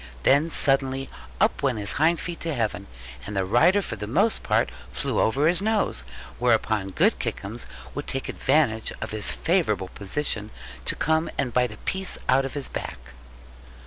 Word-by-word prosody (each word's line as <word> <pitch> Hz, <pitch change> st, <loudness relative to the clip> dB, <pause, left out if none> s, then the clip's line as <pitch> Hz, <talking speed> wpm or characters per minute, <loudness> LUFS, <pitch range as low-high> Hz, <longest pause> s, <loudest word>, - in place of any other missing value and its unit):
Then 145 Hz, -, +4 dB
suddenly 135 Hz, -3 st, +2 dB, 0.3 s
up -, -, +2 dB
went 135 Hz, -5 st, +1 dB
his 100 Hz, -1 st, -1 dB
hind 160 Hz, +3 st, +2 dB
feet 175 Hz, -1 st, -5 dB
to 165 Hz, -3 st, -2 dB
heaven, 110 Hz, -4 st, -2 dB, 0.4 s
and 105 Hz, -1 st, -4 dB
the 95 Hz, -, +1 dB
rider 170 Hz, -, +4 dB
for 115 Hz, -, -4 dB
the 105 Hz, +1 st, -5 dB
most 195 Hz, -, +2 dB
part -, -, +1 dB, 0.2 s
flew -, -, -1 dB
over 135 Hz, +7 st, +2 dB
his 175 Hz, +3 st, +3 dB
nose; 210 Hz, -, +1 dB, 0.4 s
whereupon 110 Hz, -4 st, +2 dB
good 95 Hz, -, +2 dB
Kickums 60 Hz, -, -4 dB, 0.3 s
would -, -, -5 dB
take 135 Hz, -, -2 dB
advantage 130 Hz, -6 st, +1 dB
of -, -, -5 dB
his 110 Hz, -1 st, -2 dB
favourable 110 Hz, -, 0 dB
position 105 Hz, +1 st, -2 dB, 0.4 s
to -, -, 0 dB
come 160 Hz, +1 st, +1 dB
and 130 Hz, -4 st, -1 dB
bite 125 Hz, -2 st, +2 dB
a 105 Hz, -, -9 dB
piece 190 Hz, 0 st, -2 dB
out 135 Hz, +1 st, +4 dB
of 135 Hz, -, -6 dB
his 140 Hz, -2 st, -3 dB
back. -, -, -7 dB
130 Hz, 175 wpm, -25 LUFS, 105-160 Hz, 0.4 s, Then